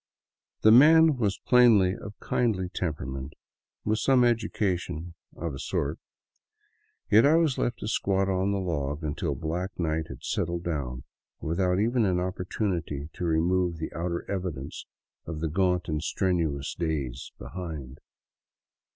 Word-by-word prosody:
The 110 - +7
man 155 +5 +7
was 105 -5 0
plainly 110 -7 +5
of 100 +1 -10
kindly 100 -7 0
temperament, 70 -5 -4 0.5
with 110 +1 +1
some 130 0 +4
education, 90 -8 -1 0.2
of 85 -3 -4
a 65 - -7
sort, - - -2 1.1
yet 110 +2 +7
I 145 +3 +5
was 165 -5 +2
left 120 -1 0
to - - -4
squat 95 -2 +1
on 95 +1 +1
the 100 - 0
log 75 -5 -2
until 75 0 -2
black 85 +6 -4
night 80 -2 -1
had - - -10
settled 85 0 -2
down, 65 -7 -3 0.4
without 90 +3 0
even 115 +3 +2
an 90 -2 +1
opportunity 90 -5 -3
to 90 - -4
remove 85 +1 +1
the 80 - -5
outer 85 +1 -3
evidence 90 -8 -5 0.4
of 80 -2 -4
the 80 0 -1
gaunt 90 +2 +1
and 75 -2 -1
strenuous 80 -7 -1
days 70 -7 -3
behind. 75 -2 -7
90 Hz, 140 wpm, -27 LUFS, 80-100 Hz, 1.1 s, The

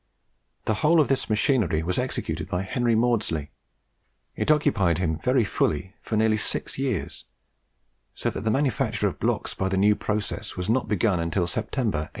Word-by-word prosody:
The 110 - +1
whole 160 +2 +5
of 150 - +3
this 135 - 0
machinery 105 - +2
was 90 +2 -1
executed - - -3
by 90 +1 -1
Henry 120 +4 +1
Maudslay; 110 -11 0 0.8
it - - -2
occupied 120 - +3
him 80 -3 -1
very 125 -1 +2
fully 95 -1 -1
for 110 - -2
nearly 110 0 +3
six 110 - -2
years, 130 -8 -2 0.9
so - - -1
that - - -5
the 110 - 0
manufacture 130 0 +1
of - - -5
blocks - - -1
by 95 - -1
the 95 - 0
new 105 +2 +4
process 105 0 -3
was 90 +4 -1
not 130 +2 +1
begun 105 -3 +1
until 85 +2 0
September, 110 - -1
1808. 75 - -5
105 Hz, 170 wpm, -25 LUFS, 90-120 Hz, 0.9 s, whole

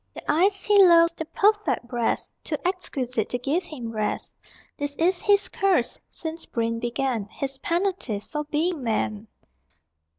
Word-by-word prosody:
The - - -2
eyes 380 +5 +2
he 410 -1 +7
loves, 335 -2 +6
The 320 - -5
perfect 415 - +1
breast, 240 -2 -1
Too - - -2
exquisite 260 - -2
To 245 - -1
give 290 +9 -1
him 245 -9 -7
rest. 215 -1 -3 0.4
This 285 0 -2
is 350 +3 +2
his 405 0 +3
curse 370 -12 +1
Since 325 0 -5
brain 230 0 -1
began. 240 -2 -1
His 270 +5 -5
penalty 345 - -1
For 300 +8 -5
being 305 0 -1
man. 215 -1 -1
295 Hz, 145 wpm, -25 LUFS, 240-360 Hz, 0.4 s, he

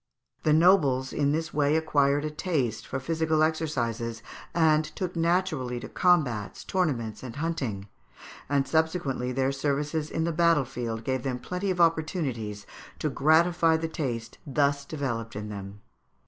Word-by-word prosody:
The 155 - +2
nobles 150 -6 +4
in 145 -1 +1
this 160 +2 -2
way 145 0 +2
acquired 145 -2 +2
a 155 - -2
taste 150 - -2
for 135 - -3
physical 160 +2 +1
exercises, 120 -8 -1 0.3
and 155 -2 +4
took 180 +3 -5
naturally 165 -7 0
to - - -7
combats, 140 - +1
tournaments, 130 - -1
and 125 -3 -8
hunting, 135 -11 -3 0.6
and 140 -1 +1
subsequently 160 -6 0
their 130 +1 +1
services 150 +3 -1
in 160 - -1
the 170 - 0
battle 165 -3 +3
field 115 -3 -4
gave 130 +1 -1
them 130 -1 -2
plenty 180 +10 -3
of 180 -1 -1
opportunities 150 - 0 0.3
to 150 - -1
gratify 165 +3 +4
the 165 0 -2
taste 125 -8 -4
thus 140 0 +1
developed 120 -7 -4
in 105 0 -5
them. 100 0 -8
145 Hz, 145 wpm, -27 LUFS, 125-160 Hz, 0.6 s, nobles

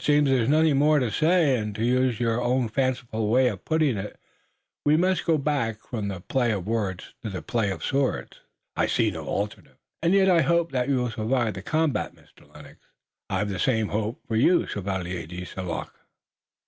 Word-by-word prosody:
"Then - - -5
it 145 - +4
seems 145 -2 +3
there 130 -2 +3
is 115 - 0
nothing 155 -1 +4
more 150 +2 +4
to 125 -6 0
say, 155 - +3
and 105 -1 -4
to 110 +2 -1
use 125 -1 +2
your 115 0 0
own 125 -1 +1
fanciful 120 -3 -1
way 125 +2 +4
of 100 -6 -7
putting 155 -7 +1
it, 100 +2 -6 0.6
we 150 +1 +4
must 185 +2 +1
go 165 -2 +4
back 135 -7 -1
from 110 -4 -5
the 95 -2 -4
play 125 +4 0
of 100 -5 -3
words 105 -5 -3
to 110 - -4
the 95 -2 -6
play 115 -4 0
of 95 - -5
swords." 135 -1 -1 0.4
"I - - +1
see - - +1
no - - -7
alternative." 105 +1 -4 0.2
"And 170 +4 +3
yet 195 -1 +4
I 175 -3 +5
hope 170 0 +1
that 130 0 -1
you 140 - +3
will 120 - -2
survive 110 +1 0
the 95 - -7
combat, 155 +5 -1
Mr. - - -23
Lennox." - - -14 0.5
"I've 100 +1 -1
the 95 -3 -4
same 110 -3 +1
hope 110 +2 -2
for 115 - -2
you, 170 +10 +4
Chevalier 90 -4 -4
de 90 +1 -7
St. 95 0 -6
Luc." 85 - -4
120 Hz, 210 wpm, -25 LUFS, 105-145 Hz, 0.6 s, I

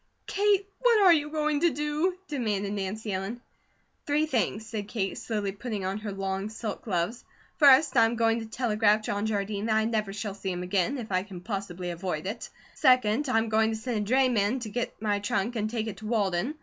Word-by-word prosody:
"Kate, 400 -1 +2
what 480 -3 +4
are 375 -4 +7
you 295 -2 +1
going 305 -1 0
to 340 +2 +4
do?" 300 +5 -1
demanded 210 -8 -1
Nancy 205 +1 -3
Ellen. 195 +6 -3 0.7
"Three 295 +1 +2
things," 225 - -1
said 215 -2 -5
Kate, 195 -4 -2
slowly 210 -3 -2
putting 205 -1 -5
on 195 +2 -2
her 210 -1 -5
long 195 +1 -3
silk 220 -1 -5
gloves. 200 +3 -1 0.3
"First, 280 -1 +6
I'm 230 0 +4
going 225 0 +2
to 225 - -7
telegraph 215 -2 +2
John 205 0 -1
Jardine 205 0 -2
that 220 - +2
I 220 0 +3
never 215 -3 -1
shall 205 0 -4
see 195 -1 -5
him 180 0 -4
again, 190 +8 0
if 225 -5 -7
I 185 0 +2
can 190 -2 -9
possibly 185 -2 -4
avoid 170 -2 -4
it. 215 +5 -5 0.2
Second, 255 0 +3
I'm 225 -2 +2
going 220 0 +3
to 220 - -2
send 235 +1 -3
a - - -3
drayman 250 -3 +3
to 220 - -5
get 240 +3 -4
my 210 -2 0
trunk 205 +3 -1
and 215 -1 -1
take 225 -1 -2
it 220 -3 -5
to 215 - -8
Walden. 210 - 0
220 Hz, 205 wpm, -28 LUFS, 200-250 Hz, 0.7 s, are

